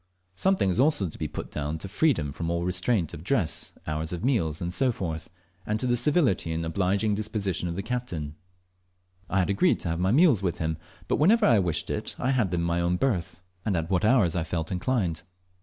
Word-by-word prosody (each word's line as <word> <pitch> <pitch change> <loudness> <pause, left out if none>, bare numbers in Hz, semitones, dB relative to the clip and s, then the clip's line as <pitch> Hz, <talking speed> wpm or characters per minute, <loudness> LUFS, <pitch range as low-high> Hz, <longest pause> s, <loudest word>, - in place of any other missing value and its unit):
Something 190 - +2
is 90 - -1
also 135 -8 +3
to - - -10
be - - -1
put - - -7
down 75 +1 -3
to 85 - -6
freedom 100 - +1
from 85 +4 -4
all 85 0 -1
restraint 90 0 +1
of 80 - -8
dress, 100 -5 0
hours 80 +1 -2
of 90 +2 -4
meals, 85 - +1 0.2
&c., 130 +5 +2 0.8
and 105 +1 0
to 125 - -2
the 120 -1 +2
civility 125 - +2
and 80 0 -2
obliging 100 +5 +1
disposition 100 -4 -2
of 85 - -4
the 100 - -3
captain. 90 -12 -4 1.0
I 95 - 0
had 95 +1 +2
agreed 175 - +3
to 85 - -3
have 85 +1 -2
my 95 +2 +2
meals 145 - +5
with 90 -4 -1
him, 80 -1 -2 0.3
but - - +1
whenever 210 +9 +4
I 115 -4 +5
wished 85 -5 -1
it - - -3
I 130 - 0
had 120 -8 +2
them 85 -1 -1
in - - -1
my 85 0 0
own 85 +1 +1
berth, 95 -7 -1 0.2
and 100 -5 0
at 80 +2 -3
what 95 +1 +2
hours 105 -7 +4
I 85 - 0
felt 80 -1 -3
inclined. 95 -3 -1
95 Hz, 215 wpm, -27 LUFS, 85-120 Hz, 1.0 s, meals